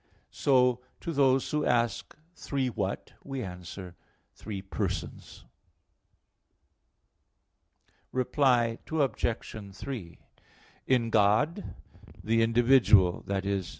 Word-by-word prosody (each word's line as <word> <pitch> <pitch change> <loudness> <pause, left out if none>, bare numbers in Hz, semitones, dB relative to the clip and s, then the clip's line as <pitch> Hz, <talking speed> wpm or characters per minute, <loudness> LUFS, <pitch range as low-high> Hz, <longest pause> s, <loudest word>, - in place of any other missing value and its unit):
So 125 -3 +3 0.2
to 170 - -4
those 135 -2 +2
who 150 0 0
ask, 120 -1 0 0.2
Three 135 -4 -2
what? 100 -4 -4
we 135 -3 -5
answer, 90 -1 -8 0.4
Three 100 -3 -7
persons. 95 - -5 2.7
Reply 125 -3 +2
Obj. 115 -8 -2
3: 100 -7 -7 0.7
In 120 -3 +2
God 110 - +2 0.5
the 115 +1 +2
individual 115 -5 +4
i.e. 100 0 -1
115 Hz, 85 wpm, -29 LUFS, 100-135 Hz, 2.7 s, individual